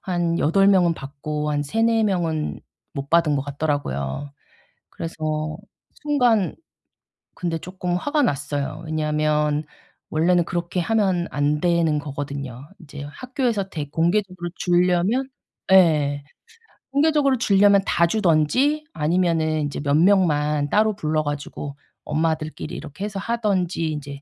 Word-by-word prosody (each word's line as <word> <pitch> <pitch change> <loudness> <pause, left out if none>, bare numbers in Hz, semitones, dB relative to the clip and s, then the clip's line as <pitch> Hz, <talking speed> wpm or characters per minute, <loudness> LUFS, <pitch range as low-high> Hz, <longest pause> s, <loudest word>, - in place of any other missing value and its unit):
한 175 -2 0
8 195 +6 +3
명은 180 -4 +4
받고 150 +2 -4
한 145 0 0
3-4 225 +8 +1
명은 170 -7 -1 0.3
못 140 0 -5
받은 165 -4 +3
것 135 - -1
같더라고요. 140 - -3 0.6
그래서 155 -1 -3 0.5
순간 245 -10 +2 0.8
근데 170 -2 -2
쪼끔 180 +1 -4
화가 290 +8 0
났어요. 145 - -2
왜냐하면 150 -1 0 0.4
원래는 170 +2 +2
그렇게 175 +1 -2
하면 190 -3 +1
안 145 +2 0
되는 170 -3 +2
거거든요. 140 -2 -6
이제 145 -3 -9
학교에서 235 - -2
대 145 -3 -5
공개적으로 175 +2 0
주려면 180 +8 +2 0.5
예. 150 -6 +4 0.7
공개적으로 285 -2 +3
주려면 200 -3 +4
다 170 -3 +3
주든지 220 - +2
아니면은 160 -1 +1
이제 145 0 -4
몇 140 0 +1
명만 150 -6 +3
따로 215 +3 +2
불러 155 -5 -1
가지고 145 -1 -5 0.3
엄마들끼리 155 0 -2
이렇게 160 +5 -7
해서 205 -1 -3
하든지 190 -7 -1
이제 140 -2 -6
165 Hz, 270 characters per minute, -23 LUFS, 150-195 Hz, 0.8 s, 명은